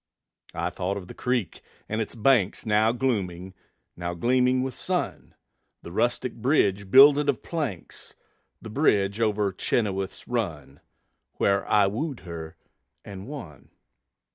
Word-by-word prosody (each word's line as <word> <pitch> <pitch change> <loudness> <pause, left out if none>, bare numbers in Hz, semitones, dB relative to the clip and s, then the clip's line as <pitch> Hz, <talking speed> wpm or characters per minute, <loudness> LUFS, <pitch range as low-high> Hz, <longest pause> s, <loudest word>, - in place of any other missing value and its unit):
I - - -2
thought 95 +2 -3
of 95 -3 -8
the - - -9
creek 125 -7 -2 0.3
and 110 +1 -2
its 110 - -5
banks, 115 -4 +2
Now 110 +1 +3
glooming, 95 -8 -2 0.4
now 85 0 -4
gleaming 125 +5 +2
with 130 -1 -3
sun; - - -3 0.5
The 85 - -9
rustic 120 +5 0
bridge 100 -6 +1
builded 145 +4 +7
of 135 - -1
planks, 140 - -5 0.4
The 110 - -9
bridge 105 -6 +2
over 105 -2 +1
Chenoweth's 95 -1 -2
Run, 80 - -3 0.5
Where 100 0 +1
I 105 -1 +5
wooed 125 - -3
her 85 -3 -8 0.5
and 100 0 -9
won. 130 - -9
105 Hz, 130 wpm, -26 LUFS, 95-125 Hz, 0.5 s, builded